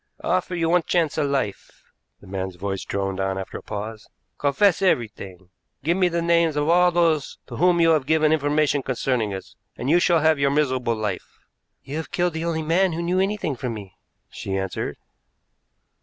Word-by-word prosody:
"I - - -5
offer 185 0 0
you 165 -1 0
one 175 +1 +4
chance 165 -2 0
of 145 - +1
life," 135 -8 -3 0.4
the - - -15
man's 95 -1 -4
voice 95 +1 -4
droned 95 -1 -3
on 95 0 -1
after 95 - -6
a - - -15
pause. 110 +1 -7 0.3
"Confess 160 +8 +3
everything. 100 - -1 0.3
Give 165 +4 +2
me 185 -1 +3
the 170 -1 -1
names 170 -2 +3
of 150 0 0
all 180 +1 +5
those 165 -4 +1
to - - -8
whom 175 0 +3
you 165 -1 +5
have 150 -4 +1
given 155 0 +3
information 145 -1 +1
concerning 125 -4 -1
us, 95 -1 -8 0.2
and 130 +4 -1
you 175 - +5
shall 175 -2 +3
have 155 -1 +3
your 140 0 +3
miserable 130 -5 +1
life." 110 -1 -4 0.5
"You 140 +3 -5
have 160 - -5
killed 175 -1 0
the 160 +1 -3
only 160 -2 -1
man 175 +3 +2
who 170 +2 -3
knew 180 +2 +1
anything 195 -6 -1
from 120 -1 -4
me," 100 -3 -10 0.4
she 95 0 -4
answered. 95 -1 -3
150 Hz, 195 wpm, -23 LUFS, 110-170 Hz, 0.5 s, all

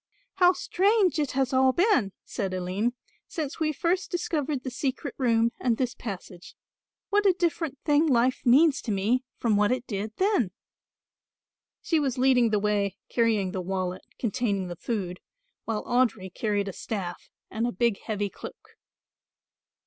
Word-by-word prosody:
"How 360 -1 +6
strange 380 0 +2
it 295 -3 -1
has 265 0 0
all 260 0 +4
been," 345 - +3
said 195 -5 -3
Aline, 185 +6 -1 0.3
"since 310 -3 -4
we 310 -1 +1
first 350 +5 0
discovered 300 -6 -2
the 260 - -4
secret 270 +2 -3
room 230 -2 +3
and 235 -3 +1
this 250 -2 -1
passage. 185 -4 -8 0.6
What 410 0 +4
a 380 - +6
different 325 -5 -1
thing 300 +1 +4
life 255 -2 +2
means 280 +4 +5
to 225 - -3
me 215 +6 +1
from 220 -3 +2
what 210 +1 +3
it 255 -1 -1
did 210 0 -4
then!" 385 - +2 1.3
She 325 - +2
was 270 -3 -1
leading 250 -2 +4
the 215 - +2
way 200 -1 0
carrying 220 -5 +1
the 190 -1 -3
wallet 185 0 -3 0.2
containing 205 -5 -1
the 175 - -5
food, 185 -3 -3 0.5
while 220 -2 -2
Audry 230 -7 +1
carried 205 -2 -1
a 195 - -4
staff 185 -4 -5 0.2
and 225 +3 -1
a - - -1
big 235 -4 +1
heavy 205 -2 -3
cloak. - - -12
240 Hz, 155 wpm, -27 LUFS, 205-290 Hz, 1.3 s, How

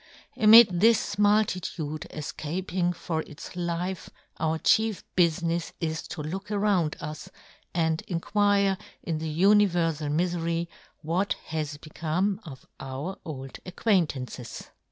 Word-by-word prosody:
Amid 215 -4 +8
this 225 -2 +3
muhitude 185 -7 +1
efcaping 175 +4 -2
for 160 -2 -2
its 150 - -10
Hfe 175 +1 -3 0.3
our 160 0 +1
chief 220 +4 +2
bufinefs 170 -1 +1
is 160 -2 -2
to 160 -4 -6
look 190 +7 -5
around 200 -6 +1
us, 155 -1 -7 0.4
and 160 -2 0
inquire, 200 +1 +2 0.2
in 160 -2 -2
the 160 0 -3
uni 200 +6 +5
verfal 165 -4 -1
mifery, 170 +1 0 0.4
what 175 +6 0
has 155 -2 -3
become 170 +6 -2
of 135 -5 -10
our 135 +8 -5
old 135 -4 -7
acquaintances. 160 - -2
170 Hz, 115 wpm, -27 LUFS, 155-195 Hz, 0.4 s, Amid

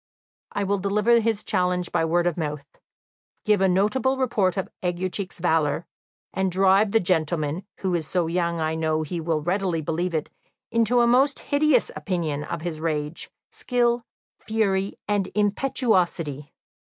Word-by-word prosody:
I 205 - -1
will 200 0 0
deliver 210 +4 +3
his 225 -2 0
challenge 180 -2 0
by 165 - +1
word 170 +2 +1
of 175 -2 +1
mouth, 150 -3 -4 0.8
give 210 -3 +3
a 190 - +4
notable 220 +8 +2
report 215 -8 +1
of 190 - -1
Aguecheek's 185 +2 -2
valour, 165 -2 +1 0.5
and 190 -1 0
drive 195 +3 +4
the 225 - +3
gentleman, 165 -1 -1
who 190 -2 0
is 165 -3 -1
so 180 -2 0
young 170 0 -1
I 160 0 0
know 160 -1 0
he 165 +2 -4
will 160 -2 -1
readily 180 -1 0
believe 165 +3 -2
it, 155 - -2 0.4
into 230 +1 +3
a - - +5
most 265 +4 +3
hideous 285 -3 +2
opinion 160 -6 -2
of 165 +2 -5
his 165 -3 -4
rage, 155 -1 -3 0.2
skill, 240 -1 0 0.4
fury, 200 -3 0
and 205 -2 0
impetuosity. 190 - 0
185 Hz, 155 wpm, -24 LUFS, 165-210 Hz, 0.8 s, a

